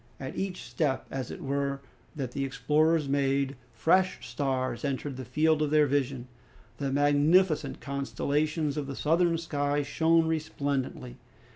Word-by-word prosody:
At 130 - -6
each 190 -2 -3
step, 145 -5 -1
as 130 -3 -4
it - - -7
were, 140 0 -1 0.4
that 135 -5 -4
the 140 - -2
explorers 150 +3 +2
made, 140 0 +1 0.2
fresh 165 - +2
stars 130 -1 -2
entered 140 0 -2
the 130 - -6
field 155 +5 +2
of 150 - +1
their 150 0 +5
vision. 135 -3 -1 0.5
The 140 0 -2
magnificent 145 +5 +3
constellations 145 +2 -1
of 145 -2 -2
the 135 - -5
southern 165 +3 +2
sky 145 -3 -1
shone 165 +3 +3
resplendently. 140 -5 -2
145 Hz, 140 wpm, -28 LUFS, 135-155 Hz, 0.5 s, their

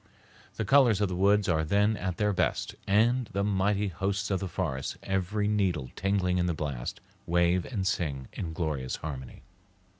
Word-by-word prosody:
The 110 - -2
colors 120 -3 +5
of 105 -2 +1
the 90 - -3
woods 100 +2 +3
are 80 -3 +2
then 100 +6 +2
at 90 -3 -3
their 105 -1 +1
best, - - 0
and 115 +5 +3
the 100 +1 0
mighty 100 0 +1
hosts 100 +3 -2
of 95 - +1
the 95 - -3
forest, 65 -5 -3
every 95 +2 -1
needle 90 -11 0
tingling 95 -2 +1
in 90 - +1
the 85 - 0
blast, 70 -6 -4 0.3
wave 85 +1 +2
and 105 -7 -3
sing 70 -8 -1
in 85 - -4
glorious 75 -6 -2
harmony. 65 -5 -7
95 Hz, 175 wpm, -29 LUFS, 85-105 Hz, 0.3 s, colors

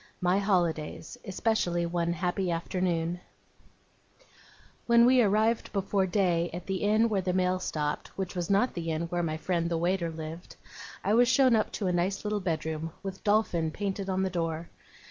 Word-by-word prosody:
MY 180 +2 +2
HOLIDAYS. 175 0 -1
ESPECIALLY 190 -4 0
ONE 170 0 -1
HAPPY 180 +2 -1
AFTERNOON 170 0 -1 1.7
When 235 0 +6
we 255 0 +6
arrived 220 +2 +2
before 195 -1 +1
day 175 -3 +1
at 175 +1 -7
the 190 -1 -2
inn 215 +3 +3
where 205 -4 0
the 180 0 -1
mail 185 0 +1
stopped, 150 -4 -2
which 190 -1 -4
was 175 -2 -3
not 200 +6 +2
the 165 -2 -4
inn 160 +1 -1
where 175 0 -1
my 155 -2 -2
friend 170 0 -1
the 170 - 0
waiter 175 0 0
lived, 160 +1 -8 0.5
I 205 - +1
was 240 +2 +5
shown 255 -1 +5
up 215 - +1
to 205 - -3
a 180 - +1
nice 180 +3 0
little 210 0 0
bedroom, 160 -3 -3
with 195 -1 -6
DOLPHIN 205 -6 +2
painted 195 -1 -3
on 190 0 0
the 190 - -1
door. 165 -1 -3
180 Hz, 175 wpm, -29 LUFS, 170-200 Hz, 1.7 s, When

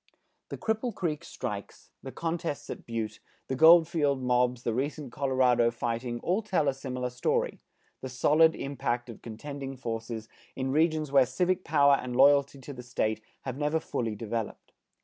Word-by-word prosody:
The - - -5
Cripple 220 0 -1
Creek 160 -3 -2
strikes, 105 -10 -7
the 135 - -7
contests 165 -1 -3
at - - -8
Butte, 110 -2 -4 0.3
the 130 - -2
Goldfield 160 -2 +5
mobs, 125 0 +1
the 115 - 0
recent 140 +2 -3
Colorado 130 -3 +3
fighting, 120 +1 -3
all 185 +5 +1
tell 185 -8 0
a 140 - +3
similar 125 -2 -4
story, 125 +1 -1 0.4
the 130 - -5
solid 150 +6 +4
impact 120 -3 -3
of 115 - -13
contending 135 +4 -7
forces 115 -2 -5 0.3
in 130 0 -2
regions 155 -1 +1
where 135 -3 +5
civic 180 +8 0
power 140 -2 +4
and 125 -1 -5
loyalty 140 +1 +5
to 145 - -8
the 125 - -8
State 110 -3 -1 0.2
have 130 +1 -5
never 150 +2 +1
fully 115 -7 -3
developed. 115 +1 -5
135 Hz, 160 wpm, -29 LUFS, 120-150 Hz, 0.4 s, Goldfield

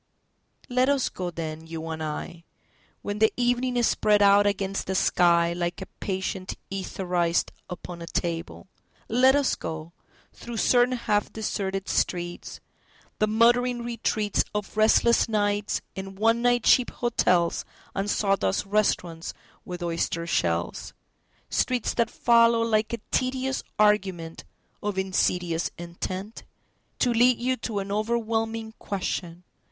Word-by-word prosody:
LET 255 +2 +2
us 280 -3 +2
go 180 -1 -4
then, 160 -1 -6
you 165 0 -6
and 160 0 -4
I,When 170 +5 -8
the 220 0 +5
evening 245 +1 +1
is 240 - +3
spread 210 -1 +3
out 200 0 +6
against 195 -1 -2
the 190 - -1
skyLike 175 -1 +2
a 190 - -6
patient 190 -1 -3 0.2
etherized 180 -3 -1 0.2
upon 175 -1 -8
a 170 - -7
table; 165 0 -3 0.4
Let 260 +4 +5
us 285 -2 +2
go, 160 +1 -6 0.4
through 235 -1 -8
certain 250 +2 +3
half 210 -3 0
deserted 195 -3 -3
streets, 175 -1 -2 0.6
The 215 - +3
muttering 240 +2 +3
retreatsOf 215 -3 -1
restless 225 +2 +4
nights 205 -1 0
in 195 0 -7
one 225 +3 +2
night 245 -1 +3
cheap 250 - +5
hotelsAnd 195 -2 -1
sawdust 195 - +1
restaurants 180 -5 -1 0.3
with 180 -1 -6
oyster 170 0 -1
shells:Streets 90 - -2
that 235 - +1
follow 230 -1 +4
like 215 -1 +1
a 235 - -1
tedious 260 +1 0 0.2
argumentOf 195 -1 -1
insidious 180 -3 0
intentTo 185 +4 -6 0.6
lead 245 +1 +4
you 255 +2 0
to 220 -2 -4
an 200 0 -3
overwhelming 225 +1 -1
question…. 180 -3 -4
205 Hz, 115 wpm, -26 LUFS, 175-230 Hz, 0.6 s, out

